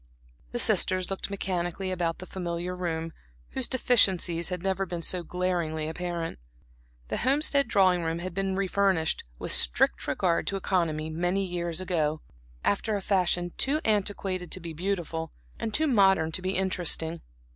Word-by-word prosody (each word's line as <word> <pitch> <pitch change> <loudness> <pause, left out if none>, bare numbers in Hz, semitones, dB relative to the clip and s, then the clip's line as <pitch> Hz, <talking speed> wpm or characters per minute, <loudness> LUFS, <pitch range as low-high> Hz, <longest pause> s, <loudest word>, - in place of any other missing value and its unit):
The - - -3
sisters 185 0 +5
looked 195 - -3
mechanically 185 -1 -3
about 170 -2 -1
the 185 - -9
familiar 180 -1 -4
room 165 -2 -3 0.4
whose 260 - 0
deficiencies 190 -9 +3
had 180 -1 -4
never 195 0 0
been 170 -1 -4
so 180 +1 +1
glaringly 170 -3 -2
apparent. 170 - -4 0.7
The - - -1
Homestead 280 +1 +2
drawing 185 -4 +3
room 165 0 -2
had 175 +1 -5
been 195 +1 -1
re 195 0 0
furnished, 190 -5 +1
with - - -4
strict - - +3
regard 175 -3 0
to 195 - -1
economy 165 -5 -1
many 175 +4 0
years 175 -2 -2
ago, 160 -5 0 0.5
after 210 +1 +1
a - - -1
fashion 175 -3 +1
too 285 +3 +2
antiquated 195 -4 -1
to - - -2
be 170 -2 -7
beautiful, 165 -2 -3 0.3
and 220 - -3
too 310 +8 +1
modern 190 - +4
to 185 - -4
be 185 +1 -1
interesting. 170 -3 0
180 Hz, 155 wpm, -27 LUFS, 170-195 Hz, 0.7 s, sisters